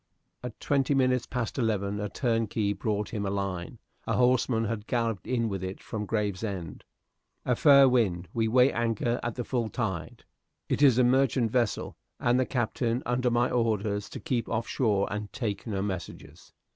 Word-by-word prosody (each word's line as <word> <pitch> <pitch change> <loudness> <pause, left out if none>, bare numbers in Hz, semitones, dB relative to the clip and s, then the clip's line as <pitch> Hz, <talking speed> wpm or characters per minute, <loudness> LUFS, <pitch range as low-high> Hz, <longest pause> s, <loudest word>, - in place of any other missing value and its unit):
At 125 -2 -7
twenty 140 0 +1
minutes 130 -2 +2
past 125 0 -3
eleven 105 -3 0
a 105 0 -3
turnkey 115 -2 0
brought 105 0 -2
him 105 -3 -3
a 100 - -1
line; 95 -3 -3 0.3
a - - 0
horseman 125 -2 +2
had 110 -1 -4
galloped 115 -5 -1
in 120 -2 0
with 95 -3 -4
it 95 +1 -5
from 105 -2 -5
Gravesend. 100 -5 -3 0.6
"A 125 - +2
fair 140 0 +7
wind 100 -9 +1
we 115 -1 +1
weigh 125 +4 +4
anchor 120 +1 0
at 120 - -3
the 125 - -3
full 120 -2 -1
tide. 95 -10 -4 0.4
It - - -1
is 135 -5 +6
a 125 - +5
merchant 125 -2 +2
vessel, 120 -4 -1 0.2
and 120 +1 +2
the 130 - +1
Captain 120 0 -1
under 125 +1 +1
my 120 +1 +1
orders 105 -4 0
to - - -7
keep 125 -8 -2
off 115 +1 -1
shore 105 -6 +1
and 105 0 -5
take 110 -3 -3
no 100 -3 -2
messages. 95 -4 -7
115 Hz, 175 wpm, -28 LUFS, 105-125 Hz, 0.6 s, fair